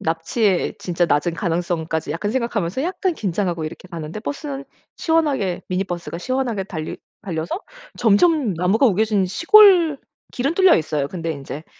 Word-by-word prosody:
납치의 175 Hz, +4 st, 0 dB
진짜 175 Hz, -1 st, 0 dB
낮은 165 Hz, +3 st, +1 dB
가능성까지 165 Hz, -2 st, -2 dB
약간 205 Hz, +5 st, -2 dB
생각하면서 235 Hz, -3 st, -1 dB
약간 365 Hz, +1 st, -1 dB
긴장하고 180 Hz, -, -2 dB
이렇게 170 Hz, +4 st, -8 dB
가는데 170 Hz, +3 st, -6 dB
버스는 285 Hz, +2 st, -5 dB, 0.3 s
시원하게 290 Hz, -, 0 dB
미니버스가 180 Hz, -2 st, -3 dB
시원하게 250 Hz, -3 st, -2 dB
달리 160 Hz, -5 st, -6 dB, 0.3 s
달려서 170 Hz, -, -3 dB, 0.4 s
점점 245 Hz, -, +3 dB
나무가 190 Hz, +10 st, +2 dB
우겨진 210 Hz, -1 st, +2 dB
시골 340 Hz, -, +6 dB, 0.3 s
길은 275 Hz, +6 st, -1 dB
뚫려 375 Hz, -1 st, +6 dB
있어요. 150 Hz, -3 st, -1 dB
근데 165 Hz, -2 st, -4 dB
인제 140 Hz, +2 st, -8 dB
195 Hz, 370 characters per minute, -21 LUFS, 170-265 Hz, 0.4 s, 시골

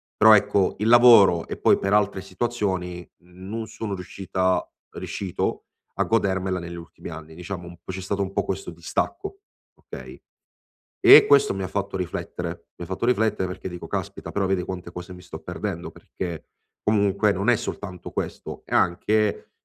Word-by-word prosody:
però 110 Hz, +1 st, +8 dB
ecco, 100 Hz, -2 st, +2 dB
il 105 Hz, +2 st, -1 dB
lavoro 115 Hz, -8 st, +7 dB
e -, -, -5 dB
poi -, -, +4 dB
per 100 Hz, -, -2 dB
altre 100 Hz, -2 st, +2 dB
situazioni, 95 Hz, -4 st, -3 dB, 0.2 s
non 95 Hz, +6 st, -7 dB
sono 105 Hz, -3 st, -5 dB
riuscita 95 Hz, 0 st, -1 dB, 0.3 s
riuscito 95 Hz, -3 st, -3 dB, 0.3 s
a -, -, +1 dB
godermela 95 Hz, -4 st, 0 dB
negli 85 Hz, 0 st, -7 dB
ultimi 85 Hz, 0 st, -10 dB
anni, 80 Hz, -1 st, -9 dB
diciamo 90 Hz, 0 st, -7 dB
u 85 Hz, +2 st, -9 dB
c'è 95 Hz, -, -6 dB
stato 100 Hz, +2 st, -2 dB
un 95 Hz, 0 st, -2 dB
po' 100 Hz, 0 st, -1 dB
questo 95 Hz, -, -4 dB
distacco, 350 Hz, -, -3 dB, 0.4 s
okay, -, -, -11 dB, 0.8 s
e 380 Hz, +3 st, +10 dB
questo 140 Hz, -7 st, +5 dB
mi 95 Hz, -, -4 dB
ha 95 Hz, -, -2 dB
fatto 100 Hz, -1 st, -3 dB
riflettere, 90 Hz, -2 st, -5 dB
mi 85 Hz, -, -6 dB
ha -, -, -13 dB
fatto 95 Hz, +4 st, -2 dB
riflettere 110 Hz, -5 st, +1 dB
perché 95 Hz, +1 st, -6 dB
dico: 90 Hz, -1 st, -7 dB
"Caspita, -, -, -5 dB
però 100 Hz, -1 st, 0 dB
vedi 95 Hz, -1 st, 0 dB
quante 90 Hz, -2 st, -6 dB
cose 90 Hz, +1 st, -8 dB
mi 90 Hz, -, -12 dB
sto -, -, -9 dB
perdendo?". -, -, -5 dB
Perché, 85 Hz, -4 st, -7 dB, 0.4 s
comunque 100 Hz, 0 st, +2 dB
non 100 Hz, +3 st, -2 dB
è 120 Hz, -, +6 dB
soltanto 95 Hz, -4 st, -6 dB
questo -, -, -5 dB
è -, -, -3 dB
anche 105 Hz, +4 st, +1 dB
95 Hz, 170 wpm, -24 LUFS, 90-105 Hz, 0.8 s, e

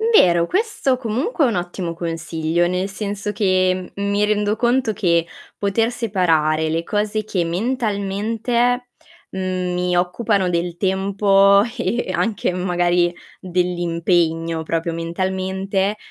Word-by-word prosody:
Vero, 180 Hz, -, +4 dB
questo 385 Hz, -, 0 dB
comunque 260 Hz, -, -1 dB
è -, -, +4 dB
un 230 Hz, -, -1 dB
ottimo 175 Hz, -1 st, -3 dB
consiglio, 165 Hz, 0 st, -1 dB
nel 180 Hz, +2 st, -1 dB
senso 205 Hz, 0 st, -4 dB
che, 185 Hz, -3 st, +1 dB
mhmm, 200 Hz, 0 st, -2 dB
mi 205 Hz, +1 st, +2 dB
rendo 210 Hz, 0 st, +1 dB
conto 240 Hz, 0 st, +1 dB
che 170 Hz, -5 st, +2 dB, 0.3 s
poter 225 Hz, +4 st, 0 dB
separare 165 Hz, -9 st, +1 dB
le 165 Hz, +1 st, -1 dB
cose 210 Hz, +3 st, -1 dB
che 185 Hz, -5 st, -1 dB
mentalmente, 225 Hz, +4 st, -1 dB, 0.4 s
mhmm, 185 Hz, -1 st, -2 dB
mi 180 Hz, 0 st, 0 dB
occupano 185 Hz, +1 st, +1 dB
del 170 Hz, 0 st, -1 dB
tempo 195 Hz, +1 st, +4 dB, 0.2 s
e 240 Hz, -, -1 dB
e -, -, -2 dB
anche 220 Hz, -5 st, 0 dB
magari 175 Hz, -1 st, +1 dB, 0.3 s
dell'impegno, 170 Hz, -2 st, 0 dB
proprio 165 Hz, +1 st, -2 dB
mentalmente, 190 Hz, +4 st, -2 dB
190 Hz, 125 wpm, -20 LUFS, 175-210 Hz, 0.4 s, Vero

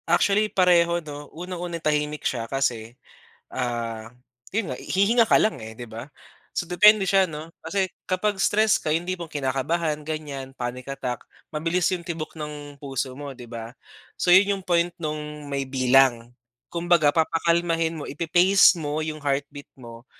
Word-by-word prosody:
Actually, 200 Hz, +5 st, +3 dB
pareho, 175 Hz, -3 st, +4 dB
'no, 145 Hz, -3 st, -8 dB
unang-una 175 Hz, 0 st, -5 dB
tahimik 150 Hz, -1 st, -1 dB
siya 115 Hz, -3 st, -2 dB
kasi, 120 Hz, -3 st, -2 dB, 0.6 s
ah, 115 Hz, -3 st, -3 dB, 0.4 s
'yon 220 Hz, -1 st, -1 dB
nga -, -, -7 dB
hihinga 220 Hz, +5 st, +3 dB
ka -, -, +7 dB
lang, 215 Hz, -, +1 dB
eh, 110 Hz, 0 st, -8 dB
di 120 Hz, -, -7 dB
ba? 115 Hz, +5 st, -8 dB, 0.4 s
So, -, -, -2 dB
depende 210 Hz, +3 st, +6 dB
siya, 195 Hz, 0 st, +4 dB
'no, 155 Hz, +1 st, -8 dB
kasi 190 Hz, +4 st, 0 dB, 0.2 s
kapag 195 Hz, +2 st, 0 dB
stress 215 Hz, +1 st, +3 dB
ka -, -, -3 dB
yung 165 Hz, +2 st, -1 dB
tipong 175 Hz, -2 st, -4 dB
kinakabahan 150 Hz, +3 st, -1 dB
ganiyan, 145 Hz, -4 st, -5 dB
panic 125 Hz, +2 st, -5 dB
attack, 125 Hz, -3 st, -4 dB, 0.3 s
mabilis 165 Hz, +3 st, +1 dB
yung 175 Hz, -2 st, -3 dB
tibok 165 Hz, -3 st, -5 dB
ng 150 Hz, -1 st, -7 dB
puso 135 Hz, -2 st, -3 dB
mo, 145 Hz, -1 st, -7 dB
di 125 Hz, -, -9 dB
ba? 115 Hz, 0 st, -7 dB, 0.4 s
So, -, -, 0 dB
'yon 200 Hz, +2 st, +5 dB
yung -, -, -13 dB
point 175 Hz, 0 st, +2 dB
nung 150 Hz, -2 st, -5 dB
may 140 Hz, -1 st, -2 dB
bilang 130 Hz, -2 st, +3 dB, 0.4 s
kumbaga, 170 Hz, -3 st, +3 dB
papakalmahin 165 Hz, 0 st, +1 dB
mo, 145 Hz, -, -6 dB
ipa-pace 175 Hz, +5 st, +5 dB
mo 150 Hz, 0 st, -2 dB
yung 155 Hz, -1 st, -5 dB
heartbeat 145 Hz, 0 st, -2 dB
mo 120 Hz, -1 st, -12 dB
155 Hz, 155 wpm, -24 LUFS, 135-175 Hz, 0.6 s, ka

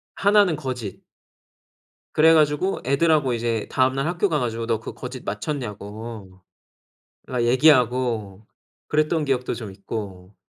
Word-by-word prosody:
하나는 200 Hz, -5 st, +4 dB
거짓. 125 Hz, -8 st, -6 dB, 1.1 s
그래 160 Hz, +1 st, +6 dB
가지고 155 Hz, +5 st, +2 dB
애들하고 140 Hz, -1 st, +2 dB
이제 115 Hz, -2 st, -2 dB
다음날 130 Hz, +2 st, +1 dB
학교 175 Hz, +4 st, +1 dB
가 150 Hz, -3 st, 0 dB
가지고 115 Hz, -1 st, -2 dB
"너 115 Hz, -2 st, 0 dB
그 -, -, -8 dB
거짓 125 Hz, 0 st, -8 dB
맞췄냐."고 105 Hz, -, -6 dB, 0.8 s
그니까 125 Hz, -2 st, -1 dB
얘기하고 120 Hz, -6 st, +2 dB, 0.4 s
그랬던 155 Hz, +1 st, +1 dB
기억도 130 Hz, -2 st, 0 dB
좀 110 Hz, -4 st, -7 dB
있고 95 Hz, -2 st, -7 dB
125 Hz, 280 characters per minute, -23 LUFS, 110-150 Hz, 1.1 s, 그래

